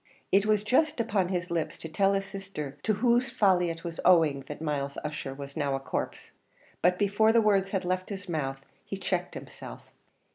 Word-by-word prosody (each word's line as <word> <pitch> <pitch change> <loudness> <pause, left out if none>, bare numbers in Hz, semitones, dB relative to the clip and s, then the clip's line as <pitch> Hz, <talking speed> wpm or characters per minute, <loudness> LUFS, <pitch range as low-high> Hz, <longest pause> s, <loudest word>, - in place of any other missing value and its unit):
It 200 +2 +4
was 210 -1 +3
just 295 +6 +2
upon 205 -5 +1
his 180 -1 -2
lips 165 -2 -1
to - - -7
tell 195 +5 +2
his 195 0 0
sister 190 -8 -6
to 215 - +1
whose 240 +4 +2
folly 185 -4 +3
it 165 0 -6
was 170 -2 -6
owing 165 -6 +5
that 150 - -7
Myles 145 -3 -2
Ussher 150 -3 -4
was 140 0 -8
now 140 -3 0
a - - -2
corpse; 135 - -4 0.5
but 180 +1 +3
before 205 +2 +3
the 230 - +5
words 200 -3 +3
had 190 -2 -2
left 185 +1 -1
his 200 -2 -6
mouth 135 -5 -3 0.2
he - - -5
checked - - -2
himself. - - -10
185 Hz, 195 wpm, -28 LUFS, 155-205 Hz, 0.5 s, owing